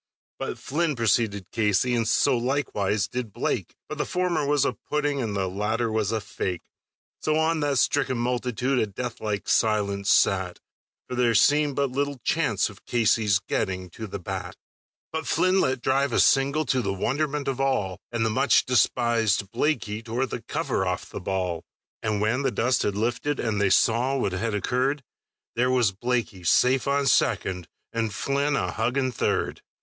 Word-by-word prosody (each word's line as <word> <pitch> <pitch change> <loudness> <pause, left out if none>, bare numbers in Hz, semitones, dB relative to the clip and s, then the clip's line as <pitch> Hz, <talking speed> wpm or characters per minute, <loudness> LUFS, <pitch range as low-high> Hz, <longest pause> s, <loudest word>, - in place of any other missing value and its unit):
But - - -4
Flynn 155 +1 -1
preceded 110 -4 0
Casey, 110 +2 +1
and 115 -2 +1
so 130 +3 +3
likewise 115 -6 0
did 120 -1 -4
Blake, - - -2
But - - -7
the - - 0
former 175 -5 0
was 145 -1 +2
a - - 0
pudding, 145 -2 -2
and 110 -4 -3
the 95 -1 0
latter 110 +5 -1
was 110 -2 0
a 110 - 0
fake; 100 -5 -4 0.6
So 155 - 0
on 160 +1 +1
that 145 -2 0
stricken 135 0 +1
multitude 125 +2 0
a 110 - +1
death 115 +4 -6
like 105 -2 -3
silence 100 -3 +1
sat, 95 -2 +2 0.5
For - - -6
there 120 -2 +2
seemed 145 +3 +4
but 140 -2 0
little 140 0 -2
chance 115 - +1
of 105 -2 -13
Casey's 110 -4 +2
getting 95 -1 -3
to 110 +5 -7
the 100 - -5
bat. 90 -2 -6 0.6
But 160 0 -4
Flynn 185 +1 +3
let 130 -1 0
drive 135 -1 +1
a - - +2
single 140 +3 +3
to 130 - +1
the 100 - -1
wonderment 140 +8 -1
of 135 -1 -1
all, 105 -9 0
And 115 -1 0
the 110 - +1
much - - +3
despisèd 115 -4 +2
Blaikie 115 -8 -1
tore 120 +3 -1
the 130 - -6
cover - - -2
off - - -3
the - - -6
ball; 90 -3 -2 0.4
And 110 -1 -1
when 110 +5 +1
the 140 - +1
dust 125 +2 +1
had 100 - -1
lifted, 120 +6 -1
and 105 -3 -1
they 100 - +3
saw 120 +7 +3
what 120 - 0
had 105 +4 -2
occurred, 130 +7 0 0.5
There 125 +2 +2
was 125 -6 +3
Blaikie 105 -4 -2
safe 125 +9 +3
on 140 0 +1
second 95 -8 +1 0.3
and 115 -2 -1
Flynn 140 +6 0
a - - -1
hugging 130 +4 0
third! - - -1
120 Hz, 175 wpm, -25 LUFS, 105-135 Hz, 0.6 s, seemed